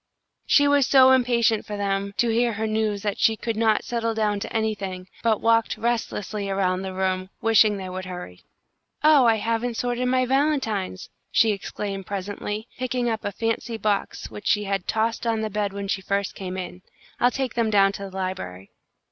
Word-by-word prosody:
She 285 0 +5
was 285 -2 +4
so 260 -1 +7
impatient 235 -4 +3
for 210 - -6
them 200 0 -2
to 240 - +2
hear 235 +1 +2
her 220 +1 -2
news 215 -2 -1
that 205 -2 -2
she 225 - +4
could 230 +1 -3
not 220 -1 +2
settle 230 -2 -2
down 210 -2 0
to - - -6
anything, 200 -4 -2
but 225 -2 +1
walked 230 0 +2
restlessly 215 -3 -2
around 190 -1 0
the 190 0 -4
room, 185 0 -1
wishing 220 -2 +4
they 190 -1 -6
would 185 0 -5
hurry. 180 - -8 0.6
"Oh, 300 -5 +6
I 225 - +5
haven't 230 +2 -1
sorted 245 0 -1
my 255 0 +2
valentines!" 250 -9 0 0.2
she 225 -2 +4
exclaimed, 195 -1 -5
presently, 205 +2 -4
picking 250 -1 -1
up 220 - -3
a 205 - -2
fancy 225 +2 -2
box 210 -2 -2
which 205 - -7
she 210 - +3
had 195 -2 -2
tossed 225 +2 0
on 225 -1 +1
the 215 -1 -3
bed 205 -1 -1
when 200 0 -5
she 195 0 -1
first 200 +1 -1
came 185 -1 -6
in. 180 0 -6 0.4
"I'll 245 - +5
take 260 -1 -3
them 230 -2 +1
down 195 -2 +4
to 200 0 -7
the 190 - -13
library." 95 - -5
215 Hz, 190 wpm, -24 LUFS, 195-230 Hz, 0.6 s, so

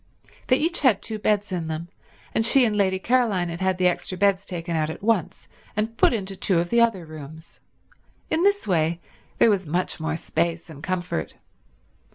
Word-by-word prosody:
They 255 - +4
each 335 +4 0
had 240 -8 +3
two 220 -1 -5
beds 210 -1 +1
in 170 -3 -2
them, 160 +1 -4 0.5
and 225 - +2
she 250 +3 +4
and 215 -2 0
Lady 190 -2 +2
Caroline 210 -5 +1
had 170 +2 -6
had 190 -1 +1
the 185 - +1
extra 180 +1 -1
beds 200 0 +2
taken 170 -2 -3
out 155 -1 0
at 160 - -7
once 220 -6 0 0.3
and 220 +2 -1
put - - +4
into 195 -4 -3
two 185 -1 +1
of 170 +1 0
the 235 0 +4
other 215 -7 +2
rooms. 155 +1 -11 0.7
In 320 - 0
this 405 - +2
way 165 -2 +1 0.4
there 225 - +5
was 190 -4 -1
much 175 +4 -1
more 160 0 -2
space 165 +1 -2
and 145 -2 -11
comfort. 175 - -3
185 Hz, 195 wpm, -24 LUFS, 165-215 Hz, 0.7 s, there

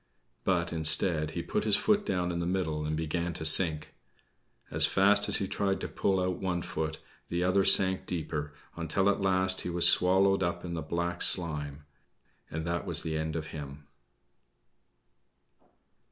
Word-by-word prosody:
But, 85 -3 0
instead, 80 0 +2
he 85 - -3
put - - -2
his 105 -2 +3
foot 210 -1 +1
down 90 -1 -1
in 85 - -3
the 85 - -2
middle 80 -5 -2
and 75 0 -2
began 85 +2 -3
to 80 - -5
sink. 80 -1 +2 0.8
As - - +5
fast 100 +1 +3
as - - +3
he 95 - -2
tried 95 0 -1
to - - -3
pull 95 -1 -1
out 90 -1 -2
one 90 -3 -2
foot, 80 0 -4 0.3
the 85 +1 -1
other 95 +2 +2
sank 95 -1 +4
deeper, 75 -3 -4 0.2
until 85 +4 -1
at 100 - -1
last 95 -1 +1
he - - -5
was 85 0 +5
swallowed 95 +2 +3
up 85 0 -2
in 85 - -5
the 80 - -4
black 85 +2 -3
slime 75 -4 0 0.6
and 80 0 -5
that 85 0 -3
was - - -1
the 80 -1 -3
end 80 0 -3
of 80 -1 -4
him. 70 -1 -9
85 Hz, 170 wpm, -29 LUFS, 80-95 Hz, 0.8 s, As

